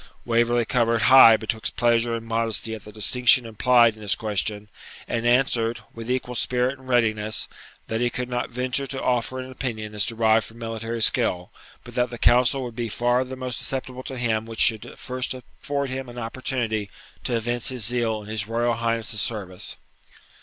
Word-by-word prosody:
Waverley 120 0 +2
coloured 115 -2 +1
high 130 -4 +9
betwixt 110 0 -3
pleasure 120 0 +2
and 115 0 -6
modesty 115 -1 0
at 110 - -8
the 105 - -10
distinction 125 +4 +3
implied 115 +1 +4
in 110 - -15
this 100 -3 +1
question, 105 -1 -2 0.4
and 120 0 -1
answered, 120 -2 +2
with 115 +1 -8
equal 125 -1 -1
spirit 125 +2 0
and 130 - -15
readiness, 110 -3 +1 0.4
that 110 +1 -3
he 120 - +2
could 125 0 -4
not 125 0 -2
venture 125 +3 -1
to 135 0 -4
offer 125 0 -1
an 130 0 -6
opinion 110 -5 -5
as 105 -1 +1
derived 110 0 +2
from 115 - -15
military 115 0 -2
skill, 90 -7 +2 0.3
but - - -12
that 125 0 +1
the 120 - -7
counsel 125 +3 +3
would 120 -2 -7
be 115 -1 -3
far 120 +3 +1
the 130 0 -7
most 130 -2 -4
acceptable 130 -1 -4
to 130 0 -7
him 115 -2 -1
which 115 -1 -3
should 110 -2 +2
first 130 0 -3
afford 140 +2 -4
him 130 -1 -5
an 120 - -11
opportunity 115 -3 -3 0.3
to 120 - 0
evince 120 +1 -1
his 125 -5 -3
zeal 115 -2 -1
in - - -13
his 110 -1 -2
Royal 120 +1 0
Highness's 115 -2 -1
service. 100 -4 -4
115 Hz, 185 wpm, -24 LUFS, 110-125 Hz, 0.4 s, high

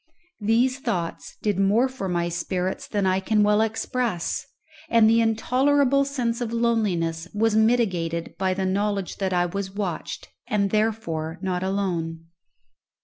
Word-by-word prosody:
These 235 +5 +2
thoughts 180 -10 -3
did 205 -3 0
more 210 +6 +3
for 255 -8 -5
my 175 -1 0
spirits 180 +2 -3
than 205 -2 -1
I 185 0 +2
can 210 +2 +2
well 210 +1 +4
express; 225 -4 -1 0.4
and 230 -2 +5
the 230 +1 +5
intolerable 270 +5 +2
sense 250 -4 -2
of 235 -2 -2
loneliness 195 -8 0
was 220 +1 +2
mitigated 190 -8 +1
by 190 -1 +1
the 190 0 -1
knowledge 200 0 -1
that 190 -1 -1
I 175 -1 +2
was 190 +2 -4
watched, 195 -5 -4 0.2
and 200 -2 +1
therefore 190 -7 -1
not 180 -1 -1
alone. 175 -4 -2
200 Hz, 145 wpm, -24 LUFS, 180-225 Hz, 0.4 s, and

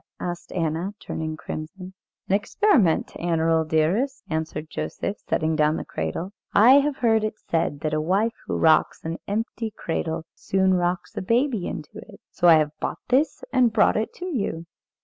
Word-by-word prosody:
asked 175 -1 -5
Anna, 170 +4 -2
turning 155 -1 -4
crimson. 180 +5 -7 0.3
"An - - 0
experiment, 210 - +2
Annerl, 165 -1 +1
dearest," 180 - +1
answered 160 -1 -3
Joseph, 200 +5 -4
setting 160 0 +1
down 155 0 +3
the - - -5
cradle. 165 - -4 0.2
"I 250 +7 +8
have 285 0 -1
heard 225 -2 +2
it 215 0 -2
said 160 -3 -2
that 155 -1 -1
a 155 - +1
wife 200 +8 +1
who - - -1
rocks 160 0 +3
an 165 +1 -3
empty 225 +2 -2
cradle 165 -5 -3
soon 190 -1 +1
rocks 180 0 -1
a - - -3
baby 230 0 +1
into 150 - -7
it. - - -13
So 175 - +2
I 165 - +9
have 155 -1 +2
bought - - -3
this 280 - +2
and 245 -3 +4
brought - - +4
it 215 +1 -1
to 360 - -7
you. 205 - -3
175 Hz, 170 wpm, -24 LUFS, 160-220 Hz, 0.3 s, I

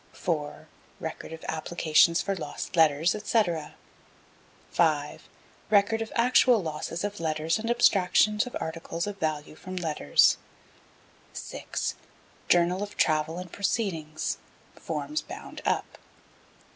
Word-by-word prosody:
4. 150 -4 -3 0.3
Record - - -6
of 160 0 -9
applications 160 +1 +3
for 195 0 -1
lost 160 +2 -6
letters, 160 +1 +4
&c. 220 +1 +3 1.3
5. 150 -3 0 0.4
Record 215 +2 +3
of 225 - -4
actual 245 0 +5
losses 165 0 -4
of 205 0 -3
letters 160 +3 0
and 225 +1 -3
abstractions 210 -1 +4
of 250 - -4
articles 165 +1 -4
of 205 -1 -6
value 155 -3 -2
from 185 +4 -8
letters. 155 - +3 0.9
6. - - -4 0.6
Journal 175 +2 +3
of 205 0 -6
travel 155 +1 +2
and 180 -1 -7
proceedings 170 -7 -2 0.3
(forms 305 +1 -3
bound - - -9
up.) - - -1
175 Hz, 115 wpm, -27 LUFS, 155-205 Hz, 1.3 s, actual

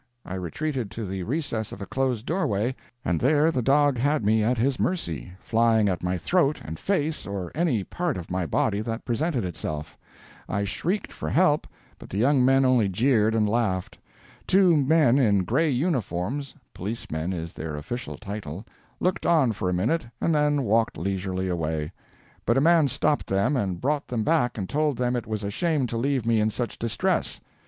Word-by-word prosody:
I - - -6
retreated 120 - -3
to 110 +4 -5
the 95 0 -4
recess 120 - -2
of - - -8
a 100 - -5
closed 130 -3 -1
doorway, 130 - 0 0.3
and 85 - +1
there 150 +4 +3
the 130 - 0
dog 140 +1 +3
had 145 -2 +1
me 110 +1 +3
at 120 +3 +1
his 130 +3 +1
mercy, 85 - -2
flying 115 -1 +2
at 90 - -2
my 90 +1 -1
throat 155 - +1
and 80 +1 -6
face 160 -5 -1
or 95 -3 -4
any 145 - +1
part 170 - -2
of 90 -1 -7
my 90 -2 -1
body 100 +4 +1
that 115 +1 -4
presented 130 - 0
itself. 75 -3 -5 0.5
I 100 -1 0
shrieked 180 - -2
for - - -4
help, 155 -4 +3 0.3
but - - -12
the 95 - -4
young 130 +4 +4
men 135 +1 +4
only 125 -6 +3
jeered 110 +1 +2
and 110 -1 +2
laughed. 105 -5 -1 0.5
Two 185 -3 +5
men 145 -2 +4
in 100 -7 +3
gray 160 - +1
uniforms 130 - -1 0.2
(policemen 90 -4 -4
is 85 -2 -5
their 80 -1 -5
official 120 +12 -5
title) 100 -2 -6 0.3
looked 180 0 0
on 155 -8 +4
for 95 -3 -2
a - - 0
minute 120 - 0
and 165 - +1
then 150 -2 +2
walked 115 0 +1
leisurely 95 0 -2
away. 80 -3 -2 0.6
But - - +3
a - - +4
man 165 -1 +5
stopped 145 +3 0
them 100 +9 +1
and 95 -8 -1
brought 145 +2 -1
them 115 -3 -1
back 125 -2 +1
and 95 -3 -3
told 150 0 0
them 125 0 0
it 120 - -3
was 110 -1 -3
a 100 - -2
shame 155 - 0
to 115 -1 -3
leave 130 0 0
me 115 -1 +3
in 105 0 +2
such 120 +2 -4
distress. 115 -1 -1
115 Hz, 190 wpm, -25 LUFS, 95-145 Hz, 0.6 s, Two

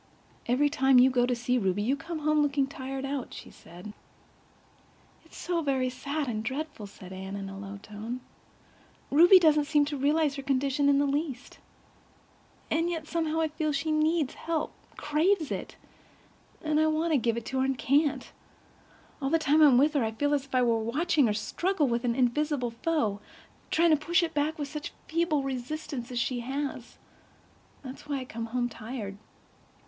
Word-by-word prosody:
"Every 255 +5 +3
time 265 -2 +3
you 255 +1 +6
go 245 -1 +2
to 250 - +1
see 245 +1 0
Ruby 195 -1 0
you 260 +6 +1
come 325 +4 -6
home 305 0 +3
looking 280 -1 +2
tired 270 0 -6
out," 275 -2 -4
she - - -10
said. 180 +5 -12 1.3
"It's - - -16
so 345 -2 -1
very 265 -4 0
sad 280 +3 -3
and 220 -3 -3
dreadful," 265 -2 -5
said 190 -2 -12
Anne 190 +1 -6
in 200 -1 -5
a 195 - -8
low 200 0 -7
tone. 220 +4 -6 0.9
"Ruby 345 +6 +8
doesn't 305 -4 +4
seem 295 -1 +3
to 290 0 -4
realize 290 +1 +1
her - - -4
condition 275 +1 +1
in 280 - +4
the 285 - +3
least. 280 -2 -3 1.1
And 330 +2 +1
yet 330 -2 -3
I 310 - -15
somehow 320 -1 0
feel 310 0 -2
she 290 +2 -1
needs 310 -2 +1
help—craves 315 +1 -1
it—and 305 -1 -6
I 315 - +4
want 315 +2 0
to 285 - +4
give 230 0 0
it 235 - -5
to 265 - -2
her 260 - +2
and 265 -1 -1
can't. 285 +3 +1 0.9
All 270 - 0
the 330 - +3
time 310 0 +3
I'm 285 -5 +7
with 295 +4 +4
her 285 -5 +2
I 220 0 -2
feel 290 +5 0
as 280 -2 0
if 270 - -6
I 250 - +4
were 230 -2 +2
watching 285 +5 +1
her 210 - +1
struggle 335 - 0
with 235 0 -1
an 235 -1 +1
invisible 260 0 0
foe—trying 305 +4 -1
to 310 - +5
push 345 +4 +2
it 330 -1 -2
back 300 +2 0
with 290 -2 -3
such 300 +1 -6
feeble 320 -3 +1
resistance 270 0 -5
as 245 - -4
she 245 +1 0
has. 265 0 -5 0.9
That 260 -1 -6
is 285 - -16
why 280 -2 -2
I - - -7
come 230 -2 -6
home 245 +1 -1
tired." 220 -3 -7
275 Hz, 185 wpm, -28 LUFS, 245-310 Hz, 1.3 s, Ruby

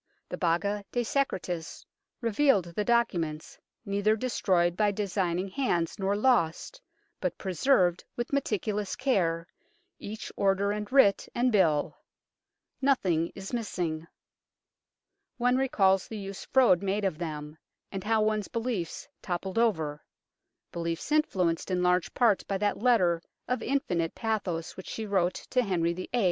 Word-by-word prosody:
The - - -3
Baga 200 +4 0
de 245 - 0
Secretis 185 - -2 0.4
revealed 225 - +2
the 210 - 0
documents, 175 -10 0 0.3
neither 205 +1 +2
destroyed 185 -7 +1
by 210 +1 +3
designing 190 -3 -1
hands 185 -8 -1
nor 195 +1 +1
lost, 240 - +1 0.4
but - - -2
preserved 185 -2 +2
with 240 +3 -4
meticulous 210 -6 -1
care, 175 -11 0 0.5
each 215 +1 -7
order 200 +1 +2
and 210 +2 -4
writ 255 -8 +4
and 250 +1 +2
bill. 165 -8 +2 0.8
Nothing 185 - +2
is 195 +4 -8
missing. 175 -8 -2 1.3
One 250 +1 +2
recalls 195 -8 +2
the 220 - -6
use 195 -1 -7
Froude 240 -10 +4
made 200 +1 -1
of 175 -5 -1
them, 155 -2 -5 0.3
and 195 -2 -5
how 220 0 +2
one's 215 -1 0
beliefs 225 -8 -3
toppled 185 +4 -2
over 160 -10 0 0.7
beliefs 170 - -4
influenced 185 - +1
in 180 -1 0
large 180 0 +2
part 225 -6 +3
by 195 - -1
that 205 +1 0
letter 190 -8 +3 0.3
of 250 -1 -1
infinite 180 - -1
pathos 195 -7 -2
which 185 - -9
she 220 - -4
wrote 185 -3 +1 0.2
to 255 - +3
Henry 170 -6 0
VIII. 185 +1 -7
195 Hz, 135 wpm, -28 LUFS, 175-225 Hz, 1.3 s, writ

